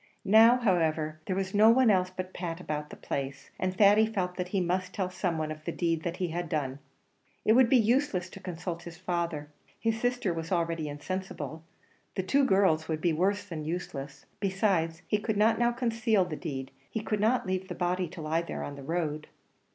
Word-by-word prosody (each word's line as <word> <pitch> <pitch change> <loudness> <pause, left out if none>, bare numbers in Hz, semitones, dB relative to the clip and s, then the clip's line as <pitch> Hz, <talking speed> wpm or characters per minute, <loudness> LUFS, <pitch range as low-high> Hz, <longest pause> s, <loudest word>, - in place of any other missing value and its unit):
Now, 225 +4 +7
however, 160 -8 +1
there 185 - 0
was 190 0 -2
no 215 +2 +7
one 240 -1 +6
else 185 -2 +2
but 185 0 -6
Pat 170 -2 -4
about 150 -4 -4
the - - -9
place, 135 0 -5
and 185 0 -1
Thady 210 +1 +6
felt 185 -5 -2
that 180 0 -3
he 195 +1 0
must 185 +1 -1
tell 185 -3 -1
some 180 -2 -1
one 155 -1 -2
of 155 0 -8
the 170 - -3
deed 165 -2 0
that 170 +2 -3
he 180 -2 -1
had 170 0 -3
done. 140 -3 -2 0.7
It 220 - +6
would 250 0 +6
be 260 - +6
useless 230 -5 +2
to - - -10
consult 175 -2 -5
his 170 -1 -10
father; 170 -4 -2 0.3
his 225 0 0
sister 245 -7 0
was 165 +1 -5
already 165 -3 0
insensible; 160 -1 -5 0.5
the 190 - -1
two 275 +9 +3
girls 190 -7 +3
would 160 -1 -1
be 170 0 +1
worse 195 +5 +1
than 165 -6 -6
useless; 150 -4 -5
besides, 185 -4 0
he 210 - +1
could 210 0 -2
not 225 +2 +4
now 240 0 +3
conceal 230 -4 +1
the 165 -3 -5
deed; 135 -5 -5 0.2
he 220 - -3
could 215 -1 -1
not 225 +3 +2
leave 185 0 -2
the - - -5
body 180 0 0
to 165 - -8
lie 160 +2 +1
there 170 - -5
on 145 - -6
the - - -8
road. 155 -1 -2
180 Hz, 210 wpm, -29 LUFS, 160-205 Hz, 0.7 s, Now